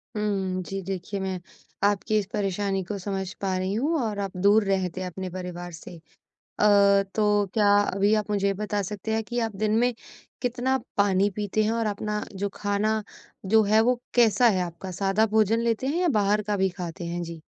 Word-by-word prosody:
हुँ, 195 -3 -1
जी, 195 +2 -5
देखिए 195 +1 -4
मैं 190 -1 -3 0.4
आपकी 205 +2 +2
इस 200 - -3
परेशानी 195 -1 -1
को 200 +3 -5
समझ 190 -1 -4
पा 190 -2 0
रही 185 +1 -1
हूँ 285 +10 0
और 210 -2 -3
आप 195 -2 -4
दूर 205 +3 +4
रहते 185 -1 -1
हैं 185 - -3
अपने 185 +2 -6
परिवार 175 -1 -6
से। 165 +1 -10 0.4
अ, 200 -1 +4
तो 210 -1 +2
क्या 210 -3 +4
अभी 205 +1 +2
आप 210 - -8
मुझे 200 -1 +1
ये 200 - +3
बता 205 0 -2
सकते 210 +3 -4
हैं 225 - 0
कि 240 +2 -4
आप 220 -3 -2
दिन 215 +1 +1
में, 245 +1 +3 0.5
कितना 250 +2 0 0.2
पानी 200 0 +3
पीते 210 +1 0
हैं 220 - +1
और 230 -1 0
अपना 210 0 -2
जो 200 +1 -2
खाना, 210 +2 0 0.4
जो 220 +2 +5
है 220 - +6
वो 245 -1 -1
कैसा 240 0 +5
है 185 -4 +2
आपका 175 +2 -6
सादा 200 +3 +3
भोजन 220 +1 +3
लेते 235 +2 0
हैं 325 +6 0
या 355 - +2
बाहर 205 +1 +2
का 205 0 -1
भी 190 0 +2
खाते 175 0 -5
हैं? 175 +1 -3
जी। 170 -1 -7
205 Hz, 200 wpm, -26 LUFS, 190-215 Hz, 0.5 s, है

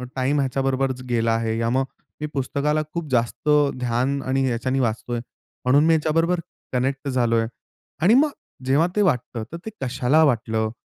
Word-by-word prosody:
Time 135 +3 +1
ह्याच्याबरोबरच 135 -1 0
गेला 115 -1 +1
आहे 115 0 -1
या 115 0 +1
मग 130 +2 +1 0.4
मी 150 - -1
पुस्तकाला 140 +3 0
खूप 170 -2 -3
जास्त 120 +4 0 0.3
ध्यान 125 +3 0
आणि 135 +1 +1
ह्याच्याने 130 +2 0
वाचतोय, 120 0 -1 0.5
म्हणून 140 +4 +5
मी 165 - +5
ह्याच्याबरोबर 165 +3 +2 0.3
कनेक्ट 135 +3 -1
झालोय. 115 -3 +1 0.5
आणि 185 +7 +5
मग 290 +4 +4 0.3
जेव्हा 140 +6 +3
ते 210 - +3
वाटतं 125 - 0
तर 170 - -5
ते - - -3
कशाला 130 +4 +2
वाटलं? 110 -5 +1
130 Hz, 155 wpm, -23 LUFS, 120-150 Hz, 0.5 s, म्हणून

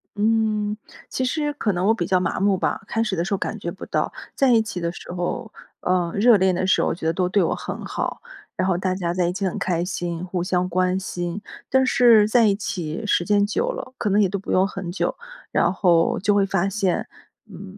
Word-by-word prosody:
嗯， 215 -1 +1 0.3
其 260 - -2
实 295 +3 -1
可 225 -7 -1
能 180 +1 -1
我 225 - +5
比 175 -6 -2
较 185 -1 +3
麻 175 -2 -1
木 195 0 +2
吧， - - -1
开 225 - 0
始 210 -4 -2
的 170 - 0
时 195 - -2
候 195 - +1
感 - - -4
觉 - - -4
不 - - -9
到， - - -1 0.2
在 270 -2 +3
一 230 -2 +5
起 195 -4 -5
的 170 - -1
时 175 - -10
候 215 +6 -3 0.3
呃， 180 -2 +1
热 220 +1 +6
恋 190 -1 +2
的 185 - -1
时 190 - +3
候 - - +1
觉 165 - -8
得 160 - +2
都 180 +1 0
对 195 -1 +3
我 - - 0
很 - - -6
好， - - -4 0.3
然 185 - 0
后 180 - +2
大 185 0 -1
家 175 -2 -2
在 180 -1 +1
一 175 - -1
起 195 +1 -2
很 185 - -3
开 175 -2 0
心， 175 -1 -4
互 180 -1 -2
相 180 0 0
关 185 +1 +1
心。 175 0 -4 0.3
但 265 0 +3
是 235 -4 +5
在 225 0 +4
一 200 - +3
起 180 -3 -4
时 175 - +2
间 205 +1 +3
久 460 - -1
了， 260 - -7
可 210 - 0
能 200 +1 +3
也 200 - +4
都 195 +2 -3
不 195 - -6
用 190 +1 +3
很 195 -3 -6
久， 180 - -1 0.4
然 175 - +2
后 175 -3 +3
就 205 +2 +2
会 200 -1 +3
发 195 0 +1
现， 195 -2 -1 0.4
嗯， 195 0 -11
190 Hz, 260 characters per minute, -23 LUFS, 180-210 Hz, 0.4 s, 热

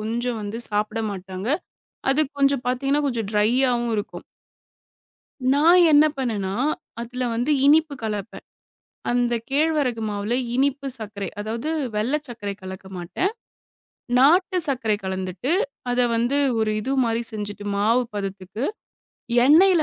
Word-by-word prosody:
கொஞ்சம் 235 +2 -2
வந்து 210 +3 -4
சாப்பிட 215 +2 -1
மாட்டாங்க. 190 +2 -6 0.6
அது 300 +3 +3 0.2
கொஞ்சம் 275 -2 +2
பாத்தீங்கன்னா 275 +4 +1
கொஞ்சம் 230 -6 -2
ட்ரையாவும் 240 +3 +2
இருக்கும். 205 0 -5 1.3
நான் 335 +5 +6
என்ன 295 +1 +7
பண்ணேன்னா, 210 -8 -2 0.5
அதுல 245 +2 -4
வந்து 245 +6 0 0.2
இனிப்பு 310 0 +4
கலப்பேன். 210 -1 -4 0.7
அந்தக் 240 -1 0
கேழ்வரகு 285 -5 +1
மாவுல 205 +3 -2 0.2
இனிப்பு 275 +1 +1
சர்க்கரை, 205 -3 -5
அதாவது 230 +8 -3 0.2
வெள்ளை 235 +8 +1
சர்க்கரை 210 -4 -5
கலக்க 190 0 -8
மாட்டேன். 180 - -2 0.9
நாட்டு 360 +8 +4
சர்க்கரை 225 -6 +1
கலந்துட்டு, 190 - -2 0.4
அத 245 - +1 0.2
வந்து 240 +5 +1 0.2
ஒரு 220 -1 +1
இது 265 +5 -1
மாரி 230 0 0
செஞ்சுட்டு, 205 -1 -6
மாவு 225 +5 +3
பதத்துக்கு 195 +3 -4 0.8
எண்ணெயில 335 +5 +6
235 Hz, 120 wpm, -23 LUFS, 210-275 Hz, 1.3 s, என்ன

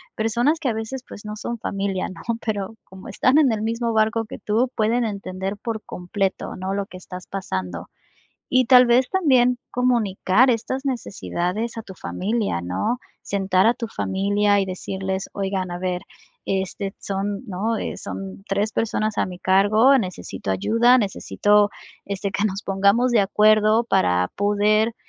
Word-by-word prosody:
personas 240 +8 +1
que 285 -6 -1
a 230 - 0
veces, 225 +4 -5
pues 205 - -11
no 210 0 -5
son 235 +2 -4
familia, 195 -3 -2
¿no?, 185 - -10 0.2
pero 210 -1 -2
como 190 0 -13
están 265 +4 +3
en 280 -5 +4
el 215 -1 -2
mismo 230 +1 -1
barco 220 +1 +2
que - - -8
tú 230 +4 0
pueden 230 +2 +1
entender 195 -1 -4
por 220 +1 -4
completo, 190 +2 -3
¿no?, 190 +1 -3
lo 200 -1 -1
que 185 - -11
estás 180 0 -9
pasando. 95 - -4 0.6
Y 255 0 +4
tal 250 0 +7
vez 250 +2 +4
también 255 -9 +3
comunicar 240 -1 +2
estas 260 +3 -2
necesidades 220 -3 -3
a 225 - -5
tu 190 - -10
familia, 205 - -2
¿no?, 150 - -1 0.3
sentar 195 0 +2
a 235 - +3
tu 230 -2 -4
familia 205 0 +1
y 195 - +1
decirles: 190 +1 -4
"Oigan, 195 -2 -2
a 175 - -4
ver, 180 -1 -2 0.4
este 195 +1 -2
son, 200 +2 -3
¿no?, 210 +4 -1
eh, - - -4
son 95 0 -7
3 205 +2 0
personas 215 -2 -1
a - - +1
mi 180 -1 -8
cargo, 210 +8 +4
necesito 180 - -5
ayuda, 230 - +4
necesito, 205 -1 +2 0.4
este, 200 0 -3
que 200 +2 0
nos 195 -1 -2
pongamos 200 +6 +2
de 235 - +4
acuerdo, 215 +2 +4
para 90 - +2
poder 210 +2 +2
205 Hz, 165 wpm, -22 LUFS, 190-230 Hz, 0.6 s, tal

